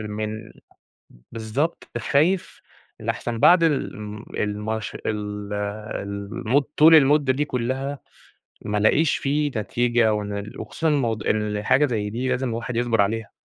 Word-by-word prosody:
من 110 +1 -5 0.8
بالضبط 115 +8 -2
خايف 165 +6 +1 0.4
لأحسن 115 -1 -3
بعد 175 +5 +6
الم 105 -9 -2
الماش 105 +1 -3
ال 105 -1 -4 0.5
المُد 110 +7 -1
طول 160 +2 +8
المُدّة 145 -2 +5
دي 145 +3 0
كُلّها 135 +2 -3 0.7
ما 105 0 -1
ألاقيش 145 +9 +3
في 145 +1 0
نتيجة 120 +1 +1
وأنا 105 -1 -3
ال 105 - -9
وخصوصًا 165 - -2
الموضوع، 115 -8 0
الحاجة 105 +6 +2
زي 105 -5 -2
دي 125 +4 -2
لازم 130 0 0
الواحد 115 +1 -4
يصبر 120 -2 +2
عليها. 110 +1 -2
115 Hz, 125 wpm, -23 LUFS, 105-140 Hz, 0.8 s, طول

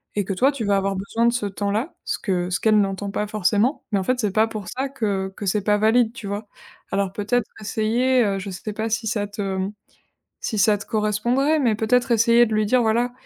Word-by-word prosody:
et 205 -2 0
que 195 - -2
toi, 260 +9 +3
tu 280 -5 -5
vas 200 -1 +2
avoir 195 0 0
besoin 200 +5 -1
de 235 - +3
ce 225 -4 -1
temps-là, 205 - -2
ce - - -2
que 180 -3 -1
ce 180 - 0
qu'elle 215 -1 +4
n'entend 200 0 -1
pas 210 - -1
forcément. 210 - +1
Mais 205 - +2
en - - -2
fait, 255 +5 0
c'est 210 -4 0
pas 220 +3 +3
pour 215 -4 -7
ça 265 +2 -2
que 200 -8 -2
que 205 - -6
c'est 205 +2 +1
pas 210 +1 +3
valide, 225 +2 +3
tu 225 -4 -8
vois? 205 +2 -4 0.4
Alors, 195 -1 0
peut-être 215 +4 -1
essayer, 235 +4 +1
heu, 200 -2 0
je 195 +1 -6
sais 210 +3 -6
pas 220 +2 -3
si 225 +1 -1
ça 205 -1 -1
te, 205 +1 -6 0.2
mmh, 190 +2 -2 0.7
si 220 - -3
ça 205 +1 +4
te 200 - -10
correspondrait, 235 +8 +1
mais 240 -7 +2
peut-être 240 +3 +1
essayer 235 +1 +5
de 220 - -2
lui 215 0 +2
dire: 250 +3 +3
«Voilà, 235 +2 +1
215 Hz, 240 wpm, -22 LUFS, 200-235 Hz, 0.7 s, essayer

